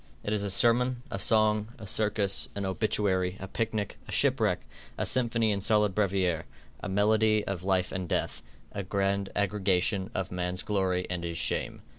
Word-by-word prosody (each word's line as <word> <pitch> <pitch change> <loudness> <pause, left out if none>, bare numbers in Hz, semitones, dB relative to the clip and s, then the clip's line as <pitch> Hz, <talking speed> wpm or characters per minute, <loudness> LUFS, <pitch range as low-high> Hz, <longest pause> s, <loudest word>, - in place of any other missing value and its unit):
It 105 - -1
is 105 - 0
a 100 - -1
sermon, 120 +5 +3
a 100 - -3
song, 110 +1 +2
a 110 - -9
circus, 105 -1 +1
an 100 -1 -3
obituary, 95 -2 0
a 95 - -6
picnic, 110 0 -3
a - - -8
shipwreck, - - +2 0.4
a - - -1
symphony 115 -3 +1
in 100 -1 -1
solid 105 -1 +3
brevier, 95 -5 0 0.3
a - - -5
medley 110 +2 +3
of 95 -3 -4
life 95 -1 +1
and 95 -2 -4
death, - - -1 0.3
a 100 - -4
grand 100 0 -1
aggregation 100 0 +1
of 95 -2 -2
man's 90 0 -3
glory 95 -3 0
and 90 -1 -3
his 85 -1 -3
shame. - - -1
100 Hz, 170 wpm, -29 LUFS, 95-110 Hz, 0.4 s, sermon